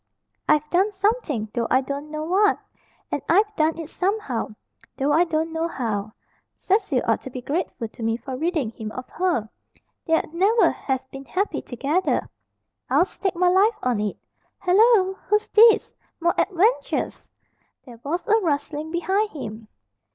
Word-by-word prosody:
I've 300 0 +3
done 380 +4 +3
something, 400 - 0
though 235 -1 -1
I 260 - +4
don't 280 +2 -5
know 305 0 -4
what. 395 +6 +3 0.5
And - - -1
I've 415 +4 +3
done 315 -1 +1
it 325 -2 -6
somehow, 360 - -2 0.4
though 280 +1 +1
I 335 +4 +5
don't 320 0 -1
know 325 +1 0
how. 215 -8 -3 0.4
Cecil 385 - +1
ought 225 - +2
to - - -8
be 255 - -6
grateful 295 -5 -2
to 230 - -14
me 225 0 0
for 260 +2 -6
ridding 310 -5 -1
him 220 -1 -7
of 255 0 -7
her. 340 - 0 0.6
They'd 325 -1 +1
never 405 +7 +4
have 265 -1 -3
been 270 0 -9
happy 395 +7 -1
together, 285 +9 -1 0.6
I'll 350 - +4
stake 385 -1 -3
my 360 +1 +3
life 410 +5 +4
on 245 -4 +1
it. 210 -1 -2 0.4
Hallo! 385 +1 +4
Who's 420 0 +2
this? 450 +1 +6 0.3
More 340 +1 +2
adventures!" 410 +6 0 0.6
There 240 -4 -12
was 340 - -3
a 440 0 +4
rustling 300 -2 -2
behind 380 +6 0
him. 220 - -8
325 Hz, 160 wpm, -23 LUFS, 260-385 Hz, 0.6 s, this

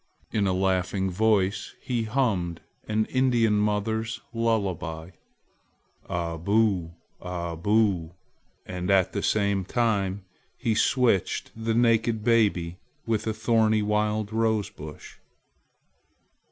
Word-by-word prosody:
In 100 -2 +1
a - - +2
laughing 95 0 0
voice 100 0 +1
he 120 -3 -2
hummed 105 -9 0 0.3
an 110 0 +1
Indian 120 -5 +2
mother's 110 +2 -1
lullaby, 95 -8 -1 1.0
"A 85 -1 -2
boo! 95 -3 +1 0.3
Aboo!" 90 +1 0 0.5
and 90 0 -4
at 95 -2 +3
the 100 - -1
same 100 -2 +1
time 100 -3 0 0.3
he 115 -4 0
switched 115 -4 +1
the 115 0 -1
naked 115 -2 +2
baby 100 -7 +2 0.3
with 110 -1 -1
a 110 - 0
thorny 110 -1 +2
wild 105 0 0
rose 110 -2 +1
bush. 75 -1 -11
105 Hz, 105 wpm, -26 LUFS, 90-110 Hz, 1.0 s, at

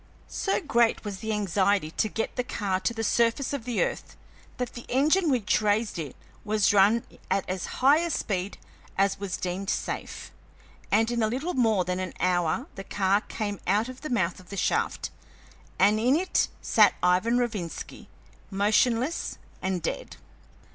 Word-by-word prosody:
So 390 - -1
great 235 - +2
was 200 -2 -5
the 220 +1 -3
anxiety 200 -4 +1
to 215 - 0
get 225 - -3
the 250 - 0
car 200 -6 -2
to 185 +4 0
the 225 -1 -4
surface 235 +5 +1
of 270 -5 -4
the 245 -3 +1
earth - - -4 0.4
that 250 -2 -3
the 240 - -9
engine 310 +7 +3
which 235 -6 +2
raised 210 -2 +1
it 145 -5 -5 0.3
was 210 -1 +2
run 205 +4 +5 0.3
at 195 - 0
as 185 -1 -3 0.2
high 285 +4 +7
a 340 0 -1
speed 195 - -2 0.4
as 195 0 +2
was 200 -2 -3
deemed 185 +2 -3
safe, - - -4 0.6
and 225 +2 +3
in 235 -1 0
a 220 - +3
little 270 +11 -2
more 220 -7 +2
than 180 +1 -2
an 185 -2 -4
hour 180 - +1
the 195 - -7
car 195 +1 +1
came 205 -4 -4
out 210 +6 +2
of 255 0 -9
the 305 - -5
mouth 185 -8 0
of 180 - -16
the 200 - -6
shaft, - - 0 0.7
and 205 +3 +4
in 250 +5 +3
it 365 +3 +1 0.2
sat - - +5
Ivan 185 +7 +3
Rovinski, 215 -9 -4 0.4
motionless 225 +8 +1 0.2
and 185 -3 -2
dead. - - -4
210 Hz, 170 wpm, -27 LUFS, 190-240 Hz, 0.7 s, high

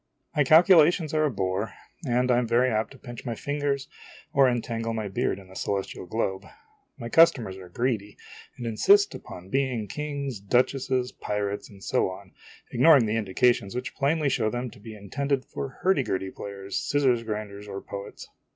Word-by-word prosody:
My 150 - +4
calculations 160 +1 +5
are 155 0 +3
a - - +2
bore; 95 -2 -2 0.3
and 125 +1 +2
I 120 - +4
am 120 - -1
very 120 +3 +3
apt 110 0 0
to - - -14
pinch 120 -1 -9
my 120 -3 -3
fingers 145 +2 -2 0.5
or 135 -2 +5
entangle 115 -1 -2
my 110 -2 -3
beard 95 -1 -1
in 95 -1 -13
the 95 - -15
celestial 95 -2 -3
globe. 95 -1 -2 0.5
My 115 - -6
customers 120 - +4
are 90 -2 -11
greedy, 110 -1 -2 0.4
and 120 - -6
insist 200 - +4
upon 90 +1 -10
being 130 -3 0
kings, 140 -5 -4
duchesses, 125 +4 +1
pirates, 105 -1 -3
and 95 -2 -15
so - - +1
on, 95 0 -10 0.4
ignoring 135 0 +6
the 110 0 -1
indications 115 +1 +1
which 125 0 -4
plainly 150 +2 +1
show 115 -5 +1
them 120 +1 -4
to - - -15
be 110 +1 -10
intended 135 +7 -2
for 140 - -5
hurdy 190 -6 +4
gurdy 95 -6 -2
players, 100 -1 -6
scissors 135 -5 +2
grinders, 105 -2 -5
or 100 -1 -5
poets. 100 +1 -8
120 Hz, 175 wpm, -26 LUFS, 100-135 Hz, 0.5 s, ignoring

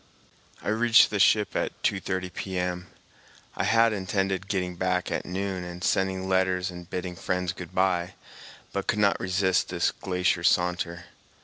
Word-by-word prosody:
I - - -2
reached 115 +2 +5
the 105 - -1
ship 105 +2 +3
at - - -2
2.30 95 -2 -1
P.M. 90 -1 -3 0.7
I - - -1
had 115 0 +4
intended 95 -1 -1
getting 90 -3 -2
back 90 0 -1
at - - -2
noon 95 0 -3
and 90 0 -8
sending 95 +1 0
letters 95 -1 +1
and 90 0 -10
bidding 90 0 -4
friends 90 +1 -2
good 90 -3 -10
bye, 90 -1 +1 0.6
but 100 - -3
could 105 - +1
not 100 -1 +3
resist 95 0 +1
this 90 -1 +1
glacier 90 -2 -1
saunter. 90 -1 +1
95 Hz, 150 wpm, -27 LUFS, 90-95 Hz, 0.7 s, reached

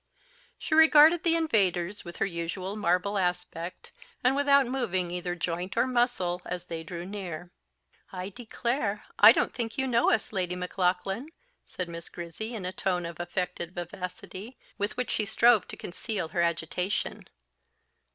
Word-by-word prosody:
She - - -4
regarded 320 +1 +7
the 335 -1 +3
invaders 200 - +1
with 175 -1 -9
her - - +1
usual 185 +2 -4
marble 200 0 +1
aspect, 180 -1 -3 0.3
and 255 +2 +4
without 280 -1 +5
moving 190 -9 -1
either 175 0 -3
joint 175 +4 -3
or 235 - +4
muscle 240 -8 +1
as 180 0 -5
they 165 -1 -5
drew 170 +1 -6
near. 180 -4 -6 0.6
"I 185 0 -5
declare 230 -1 -2
I 210 +2 +11
don't - - +1
think 230 -2 -4
you 265 - +1
know 240 -2 +3
us, 220 0 0
Lady 180 -2 -1
Maclaughlan," 185 - -1 0.4
said 180 - -4
Miss 170 0 -8
Grizzy 175 +7 -6
in 200 -5 -5
a 185 - -2
tone 180 -3 -1
of 170 0 -7
affected 175 0 -3
vivacity, 185 +5 -7 0.2
with 205 +3 -3
which 250 -2 -1
she 215 - +1
strove 220 -1 +4
to - - -7
conceal 185 -1 -4
her 175 -1 0
agitation. 170 +3 -1
190 Hz, 155 wpm, -28 LUFS, 175-235 Hz, 0.6 s, I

